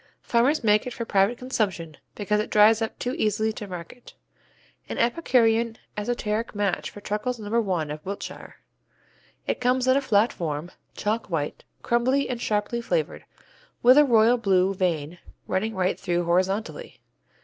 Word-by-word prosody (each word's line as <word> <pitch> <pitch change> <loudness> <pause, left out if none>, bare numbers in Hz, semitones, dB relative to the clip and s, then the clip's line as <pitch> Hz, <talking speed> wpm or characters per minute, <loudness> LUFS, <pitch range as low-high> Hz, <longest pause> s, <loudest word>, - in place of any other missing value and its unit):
Farmers 255 +5 +2
make 210 +1 +3
it 250 - -5
for 230 - -4
private 200 +3 +2
consumption, 195 - -2 0.2
because 210 0 0
it 215 - -2
dries 215 +2 +5
up 225 - -3
too 250 - -3
easily 215 +1 +1
to 210 - -7
market. 180 +6 -10 0.7
An - - -4
epicurean 235 -3 +2 0.2
esoteric 215 0 -2
match 205 -3 -1
for 205 - -12
Truckles 215 +5 -2
No. 220 +2 0
1 175 -8 -2
of 150 0 -7
Wiltshire. 200 +1 -7 0.9
It - - -2
comes 250 +1 +1
in 260 - +5
a 280 - +2
flat 220 -3 +2
form, 160 +1 -4 0.2
chalk 215 +1 -2
white, 150 -4 -3 0.2
crumbly 255 +4 +1
and 245 -2 -3
sharply 215 +1 -1
flavored, 480 - -2 0.6
with 250 +2 +8
a 295 - +7
"royal 235 -2 +4
Blue" 195 -4 +2
vein 175 -3 -2 0.3
running 215 +4 -2
right 185 0 0
through 175 -1 -1
horizontally. 190 - -1
215 Hz, 155 wpm, -25 LUFS, 190-240 Hz, 0.9 s, with